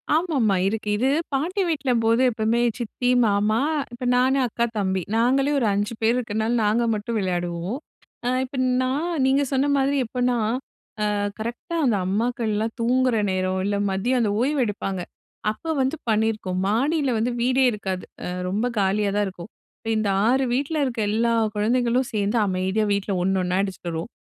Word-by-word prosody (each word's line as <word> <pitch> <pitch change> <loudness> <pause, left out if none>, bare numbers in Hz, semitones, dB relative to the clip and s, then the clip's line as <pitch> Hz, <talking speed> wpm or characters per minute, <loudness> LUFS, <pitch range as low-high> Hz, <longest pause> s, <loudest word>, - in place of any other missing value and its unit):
ஆமா 335 +1 0
ஆமா 210 -3 +3
இருக்கு. 210 +1 -2
இது 260 +4 +2 0.2
பாட்டி 345 +9 0
வீட்லம்போது, 245 -7 +1
எப்பவுமே 225 +1 +1 0.2
சித்தி, 245 +1 -2 0.2
மாமா 210 +2 +2 0.3
இப்ப 240 - -8
நானு 260 +2 +3
அக்கா, 235 +1 -1
தம்பி. 190 -2 0
நாங்களே 265 +5 +2
ஒரு 230 - +1
5 205 +3 -1
பேர் 225 +2 +3
இருக்கிறனால 220 -1 -1
நாங்க 220 +3 +2
மட்டும் 215 +2 -2
விளையாடுவோம். 175 +2 -2 0.5
அ - - +2 0.2
இப்ப 265 +1 -8 0.2
நான் 265 +5 0 0.2
நீங்க 270 +2 +3
சொன்ன 270 +1 +2
மாதிரி 275 +1 +1
எப்பன்னா, 245 +1 0 0.7
அ - - 0 0.3
கரெக்டா 240 - -5
அந்த 235 -5 +3
அம்மாக்கள்லாம் 220 +1 -1
தூங்குகிற 250 +1 +2
நேரம், 185 0 0
இல்ல 205 +1 0
மதியம் 240 +7 0
அந்த 210 - +1
ஓய்வு 280 +3 +1
எடுப்பாங்க. 195 -2 -3 0.5
அப்போ 325 +9 -6
வந்து 265 +4 +1
பண்ணியிருக்கோம். 215 -4 0
மாடியில 275 +6 +1
வந்து 235 +3 0
வீடே 260 +2 +3
இருக்காது. 190 -3 -4 0.2
அ - - -3 0.2
ரொம்ப 210 +5 0
காலியா 200 +1 +1
தான் 205 0 +2
இருக்கும். 185 +2 -10 0.3
இப்ப 225 - -5
இந்த 215 - 0 0.2
6 265 +2 +3
வீட்ல 285 +5 -1
இருக்க 240 -3 -3
எல்லா 230 +2 +1 0.2
குழந்தைகளும் 240 +3 +1
சேந்து 210 +2 0
அமைதியா 190 +3 0
வீட்ல 200 0 -1
ஒண்ணு 190 +1 +1
ஒண்ணா 180 +1 0
அடிசிச்சுட்டு 185 -3 -5
வருவோம். 165 +7 -4
225 Hz, 160 wpm, -23 LUFS, 205-255 Hz, 0.7 s, ஆமா